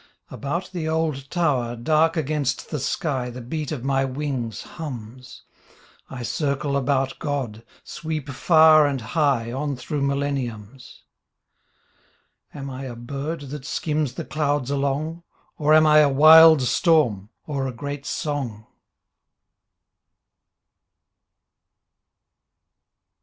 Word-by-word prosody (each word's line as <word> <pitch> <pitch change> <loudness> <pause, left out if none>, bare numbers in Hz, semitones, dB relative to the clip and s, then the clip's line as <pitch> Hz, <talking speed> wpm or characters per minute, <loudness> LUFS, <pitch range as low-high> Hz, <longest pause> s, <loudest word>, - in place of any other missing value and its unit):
About 170 +7 -4
the 165 -3 -3
old 155 -4 -2
tower, 135 -9 0
dark 155 +7 +2
against 145 -4 -2
the 150 - -2
sky. 135 -2 -2
The 125 +1 -8
beat 150 +5 -5
of 140 -6 -4
my 135 0 +1
wings 130 -5 -4
hums, 125 -5 -9 0.7
I 125 -2 -7
circle 140 +3 -1
about 135 -1 0
God, 125 -7 -4 0.2
sweep 155 -2 -5
far 155 +2 +5
and 140 -2 -2
high 125 -2 0
On 140 +2 -3
through 135 +4 -4
milleniums. 135 -4 -4 1.5
Am 140 -1 -7
I 130 +1 -6
a 125 -2 -7
bird 140 +6 -5
that 150 -2 -6
skims 150 -2 -2
the 165 - -5
clouds 145 -3 -1
along. 140 +4 -2 0.4
Or 150 0 +2
am 155 0 +6
I 155 0 +6
a 150 -2 +5
wild 155 +1 +8
storm, 125 - +2 0.2
or 140 -3 -2
a - - -3
great 140 +3 -6
song? 130 -8 -4
140 Hz, 115 wpm, -23 LUFS, 130-155 Hz, 1.5 s, wild